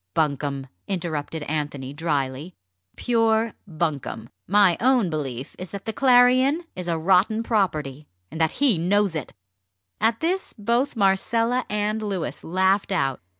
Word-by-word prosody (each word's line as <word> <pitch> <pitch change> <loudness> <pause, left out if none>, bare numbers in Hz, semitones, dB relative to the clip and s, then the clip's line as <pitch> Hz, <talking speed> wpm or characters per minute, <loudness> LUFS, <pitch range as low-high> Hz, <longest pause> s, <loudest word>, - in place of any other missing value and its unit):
"Bunkum!" 140 -3 -1 0.2
interrupted 160 -4 -3
Anthony 145 -3 -4
drily; 145 +1 -2 0.4
"pure 225 -2 +1
bunkum! 155 - -3 0.2
My 200 -2 +5
own 245 -7 +3
belief 135 -4 -4
is 185 0 -5
that 200 -1 -8
the 220 - -3
Clarion 255 +5 +4
is 180 -1 -6
a 170 -1 0
rotten 190 +6 +3
property, 155 - -1 0.2
and 160 - -4
that 160 - +2
he 255 - +2
knows 200 +2 +2
it!" 155 -5 -5 0.7
At 225 +1 +2
this 365 +4 -1
both 235 +6 0
Marcella 230 +5 +1
and 210 +1 -1
Louis 175 - -4
laughed 190 +4 +1
out. 135 -8 0
190 Hz, 135 wpm, -24 LUFS, 155-225 Hz, 0.7 s, My